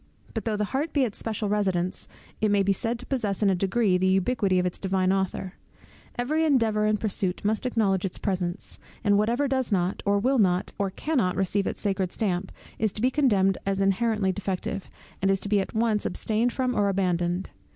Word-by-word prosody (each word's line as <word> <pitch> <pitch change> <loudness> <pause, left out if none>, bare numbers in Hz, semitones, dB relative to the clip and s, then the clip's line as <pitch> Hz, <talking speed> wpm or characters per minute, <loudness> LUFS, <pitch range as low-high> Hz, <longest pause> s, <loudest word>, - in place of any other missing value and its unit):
But 225 - -4
though 220 -2 0
the 210 - 0
heart 295 +4 -1
be 280 - +3
its 225 -5 -3
special 220 -1 -2
residence, 190 -3 0 0.3
it 215 - +3
may 205 -1 +3
be 195 0 +2
said 230 +5 -2
to 250 - -9
possess 215 -7 -1
in 200 - +4
a - - +2
degree 195 0 +1
the 185 - +2
ubiquity 190 +1 +2
of 180 - +2
its 180 - -2
Divine 190 -1 +1
Author. 190 -1 -2 0.6
Every 300 +7 +1
endeavour 225 -8 +2
and 215 -1 +1
pursuit 195 -3 -1
must 220 +4 +1
acknowledge 200 -6 +1
its 195 - -3
presence; 180 -2 -2 0.2
and 205 -1 +4
whatever 235 +7 +2
does 260 -3 -1
not, 185 -1 0
or 200 0 +2
will 255 +5 +2
not, 185 -2 +2
or 200 -1 +1
cannot 220 -3 0
receive 195 +1 0
its - - -4
sacred 190 -3 0
stamp, 190 -3 -1 0.3
is 220 -1 +1
to 210 - -5
be 255 - +3
condemned 205 -10 +2
as 195 0 -1
inherently 195 0 +1
defective, 195 0 -4 0.3
and 195 - +2
is 195 -1 +2
to 205 - -2
be 205 -1 +3
at 195 - -4
once 220 -2 +1
abstained 225 +3 0
from 255 0 -1
or 205 -1 +2
abandoned. 180 -1 0
200 Hz, 205 wpm, -26 LUFS, 190-225 Hz, 0.6 s, in